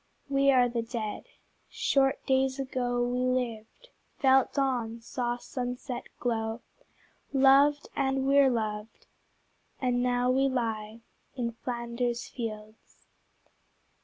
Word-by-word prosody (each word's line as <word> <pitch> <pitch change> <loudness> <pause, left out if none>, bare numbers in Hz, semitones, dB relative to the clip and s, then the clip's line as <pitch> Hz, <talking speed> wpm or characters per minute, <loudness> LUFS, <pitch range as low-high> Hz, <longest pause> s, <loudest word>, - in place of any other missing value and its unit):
We 275 0 +3
are 255 -2 +5
the 235 -1 -2
Dead. 225 -2 -5 0.4
Short 270 -1 +1
days 265 0 +2
ago 250 -2 -1
We 245 +1 -1
lived, 250 - -2 0.3
felt 265 -2 +4
dawn, 245 -5 -1
saw 240 +1 -3
sunset 245 0 -5
glow, 225 -1 -2 0.7
Loved, 275 +2 +5
and 270 -1 0
were 275 0 +6
loved, 215 -2 -3 0.7
and 250 -1 +1
now 245 0 +2
we 270 +1 +3
lie 225 -3 -3 0.3
In 240 -3 -2
Flanders 235 0 -3
fields. 215 -2 -8
245 Hz, 105 wpm, -29 LUFS, 230-265 Hz, 0.7 s, were